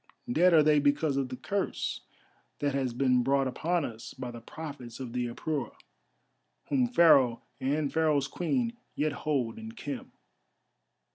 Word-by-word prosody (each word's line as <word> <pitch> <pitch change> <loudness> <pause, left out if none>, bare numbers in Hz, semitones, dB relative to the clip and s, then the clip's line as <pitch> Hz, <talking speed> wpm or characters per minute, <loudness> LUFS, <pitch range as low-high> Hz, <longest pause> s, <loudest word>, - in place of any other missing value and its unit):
Dead 180 -5 +5
are 160 -2 +6
they 150 0 +5
because 145 0 +2
of 135 -2 -1
the 130 - -4
curse 200 +8 -2 0.6
that 145 -1 -1
has 135 -2 0
been 125 0 +2
brought 135 +2 +2
upon 165 +5 0
us 115 -1 -8
by 125 -2 -5
the 120 -1 -9
prophets 135 -3 -8
of 125 -3 -6
the 125 -1 -1
Apura, 145 +5 -3 0.9
whom 260 -3 +3
Pharaoh, 140 - +5 0.2
and 145 +2 0
Pharaoh's 155 -4 +2
Queen, 235 - -1 0.2
yet 155 +1 +1
hold 140 - -2
in 225 0 -8
Khem." 255 +1 -6
145 Hz, 150 wpm, -29 LUFS, 130-165 Hz, 0.9 s, are